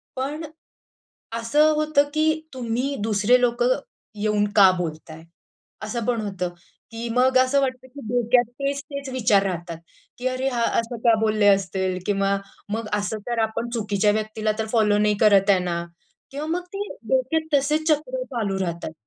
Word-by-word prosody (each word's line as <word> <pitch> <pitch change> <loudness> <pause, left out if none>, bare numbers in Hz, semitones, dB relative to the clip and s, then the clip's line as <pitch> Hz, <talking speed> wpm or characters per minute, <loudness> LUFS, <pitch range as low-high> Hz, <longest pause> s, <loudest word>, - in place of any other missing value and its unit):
पण, 285 +5 -3 0.9
असं 290 +7 +3
होतं 305 -1 +3
की 315 0 +1
तुम्ही 255 +3 -2
दुसरे 220 +3 +3
लोकं 250 - +2 0.4
येऊन 210 0 +1
का 195 -3 +8
बोलताय? 160 -1 -6 0.6
असं 215 +2 -3
पण 240 -2 0
होतं 190 -4 -3 0.4
की 230 +1 -5
मग 255 +1 +4
असं 260 +2 +3
वाटतं 260 -1 -3
की 280 +2 -11
डोक्यात 245 0 +3
तेच-तेच 280 0 -4
विचार 215 -6 +3
राहतात, 175 -3 -4 0.4
की 250 - -2
अरे 255 +1 -1
हा 240 -3 -1 0.2
असं 230 +1 -4
का 230 -1 +6
बोलले 215 -1 +2
असतील? 190 -1 +1
किंवा 195 -1 +1 0.4
मग 225 -1 -3
असं 205 +2 -3
तर 235 -1 -1
आपण 220 +2 -3
चुकीच्या 210 -2 +1
व्यक्तीला 215 0 -1
तर 220 - -1
फॉलो 210 -2 +3
नाही 210 0 +2
करत 205 -2 +5
आहे 190 -2 +5
ना? 170 -1 -2 0.5
किंवा 290 +2 -5
मग 350 +3 -1
ते 405 +1 -3 0.2
डोक्यात 300 +5 0
तसेच 305 +3 0
चक्र - - 0
चालू 210 - -3
राहतात. 170 -3 -3
230 Hz, 155 wpm, -23 LUFS, 205-270 Hz, 0.9 s, का